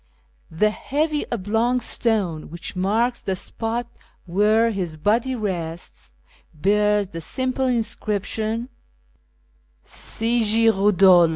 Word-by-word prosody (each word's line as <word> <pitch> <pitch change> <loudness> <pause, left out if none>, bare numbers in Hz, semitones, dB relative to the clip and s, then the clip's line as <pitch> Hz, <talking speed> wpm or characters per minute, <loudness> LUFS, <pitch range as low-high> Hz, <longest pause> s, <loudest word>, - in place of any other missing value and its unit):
The 210 +7 +2
heavy 300 +6 -1
oblong 230 +3 +1
stone 205 -11 -1
which 170 +3 -7
marks 225 +6 +1
the 190 - -2
spot 230 +5 -3 0.4
where 210 +5 +3
his 180 -6 -4
body 230 - +1
rests 170 - -5 0.4
bears 205 +3 +2
the 165 -3 -7
simple 260 - -1
inscription 225 0 -1 0.6
" 60 -1 -41 0.4
CY 230 +2 -1
git 225 +1 +4
rodolfe." 190 -4 +5
210 Hz, 105 wpm, -22 LUFS, 185-230 Hz, 0.6 s, rodolfe